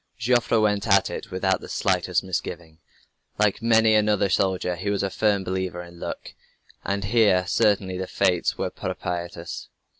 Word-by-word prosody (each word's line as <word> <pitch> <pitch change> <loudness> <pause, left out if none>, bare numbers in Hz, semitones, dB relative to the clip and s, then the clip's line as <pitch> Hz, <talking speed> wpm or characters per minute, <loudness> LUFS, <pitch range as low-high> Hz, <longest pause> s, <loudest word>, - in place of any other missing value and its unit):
Joffre 120 0 +2
went 105 -1 +1
at 100 -2 +4
it - - -6
without 95 0 0
the - - -10
slightest - - 0
misgiving. 85 -3 -5 0.6
Like 105 +1 +1
many 115 -1 +4
another 105 -2 +2
soldier 90 -1 0
he 95 +4 -4
was 100 -1 0
a 100 - -1
firm 105 -2 +1
believer 95 -1 -3
in 85 0 -14
"Luck," - - -6 0.5
and 100 +1 -2
here 100 -3 +3
certainly 100 -2 +1
the 95 - -3
fates 90 -2 +1
were - - -2
propitious. 85 -1 -5
95 Hz, 155 wpm, -24 LUFS, 90-105 Hz, 0.6 s, at